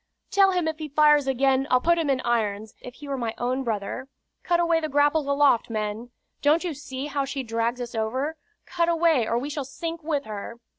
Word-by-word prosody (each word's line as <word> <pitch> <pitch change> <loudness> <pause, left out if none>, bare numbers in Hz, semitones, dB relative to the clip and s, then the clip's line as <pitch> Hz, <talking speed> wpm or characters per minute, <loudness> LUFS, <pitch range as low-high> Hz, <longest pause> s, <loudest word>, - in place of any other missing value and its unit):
"Tell 395 -1 +5
him 360 -3 0
if 315 0 -3
he 310 -1 -5
fires 295 -1 +4
again, 270 +1 +2
I'll 255 - +4
put 340 +5 +2
him 315 -3 0
in 265 -1 +1
irons, 215 -3 -1
if 250 - -10
he 295 - -11
were 275 -1 -3
my 230 -2 -3
own 255 +2 -1
brother. 225 +3 -3 0.3
Cut 345 -1 +1
away 335 -1 +3
the 310 -1 -3
grapples 290 +1 +2
aloft, 280 -5 +3
men. 215 +1 -3 0.3
Don't 305 +4 +3
you 350 -3 -2
see 270 -1 -6
how 285 -1 -1
she 270 0 -4
drags 230 +1 -1
us 240 -1 -5
over? 255 +8 -2 0.3
Cut 340 -1 0
away, 325 -8 +3
or 230 - +1
we 280 +5 -3
shall 290 -1 -3
sink 330 +5 -6
with 295 -3 -2
her." 215 +2 -7
275 Hz, 215 wpm, -25 LUFS, 240-310 Hz, 0.3 s, Tell